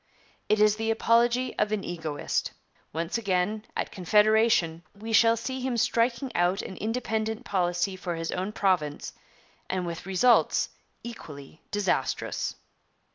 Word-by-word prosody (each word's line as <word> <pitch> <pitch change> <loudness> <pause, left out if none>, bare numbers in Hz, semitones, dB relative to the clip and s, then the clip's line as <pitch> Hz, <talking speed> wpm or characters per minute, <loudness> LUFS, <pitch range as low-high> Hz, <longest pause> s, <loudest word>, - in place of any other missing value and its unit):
It 215 - +3
is 210 0 +4
the 225 0 -1
apology 235 +2 +2
of 210 0 +1
an 215 -2 -1
egoist. 160 -4 -3 0.4
Once 165 +7 -2
again, 205 +1 0
at - - -2
Confederation, 210 -3 +3
we 220 +3 -6
shall 230 +1 +5
see 260 +3 -4
him 255 -2 -1
'striking 235 +3 +1
out 175 +3 +2
an 190 - -7
independent 220 -1 -2
policy 180 0 0
for 180 -2 -4
his 165 0 -3
own 185 +3 -2
province,' 180 -8 0 0.6
and 185 -1 -1
with 170 +1 -6
results 210 +6 +3 0.3
equally 155 -11 -10
disastrous. 205 -1 -1
210 Hz, 130 wpm, -27 LUFS, 175-230 Hz, 0.6 s, shall